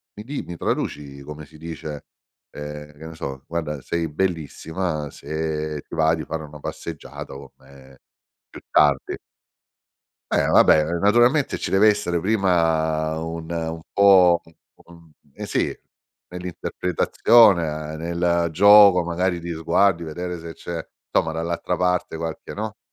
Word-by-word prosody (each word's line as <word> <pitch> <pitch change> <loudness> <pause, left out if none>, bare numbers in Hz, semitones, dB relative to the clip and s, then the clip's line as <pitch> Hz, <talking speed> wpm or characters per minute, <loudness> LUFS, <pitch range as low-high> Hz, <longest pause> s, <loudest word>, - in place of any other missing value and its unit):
mi 105 - -8
di 140 +3 -4
mi 85 -1 -8
traduci 70 -1 -3
come 75 +2 -9
si 75 +2 -17
dice" 80 -2 -7 0.5
ehm, 75 0 -8
che 80 - -11
ne 80 0 -9
so 65 -3 -7
"guarda 80 -3 -3
sei 85 +3 -2
bellissima, 80 -1 -3
se 75 0 -4
ti - - -8
va 80 0 +3
di 80 - -6
fare 80 -1 -4
una 75 0 -11
passeggiata 80 0 -7
con 70 0 -10
me 65 -1 -18 0.5
più - - -12
tardi." - - +3 1.1
Eh - - +2
vabbè 75 - +5 0.2
naturalmente 120 - +3
ci - - -4
deve 100 +3 +6
essere 100 -5 0
prima 80 -5 +1
un 80 0 -6
un 80 -1 -3
po' 95 -4 +6 0.5
un 85 -1 -17 0.2
un - - -7
sì - - -1 0.5
nell'interpretazione, 90 -2 +2
nel 85 +1 0
gioco 100 0 +7
magari 85 +1 -1
di 85 0 -5
sguardi 85 +2 +2
vedere 90 +2 -5
se 80 0 -8
c'è 85 -1 -6 0.3
insomma 80 - +1
dall'altra 85 +2 -2
parte 90 -2 0
qualche 80 0 -6
no, 110 +1 -5
85 Hz, 135 wpm, -22 LUFS, 80-90 Hz, 1.1 s, gioco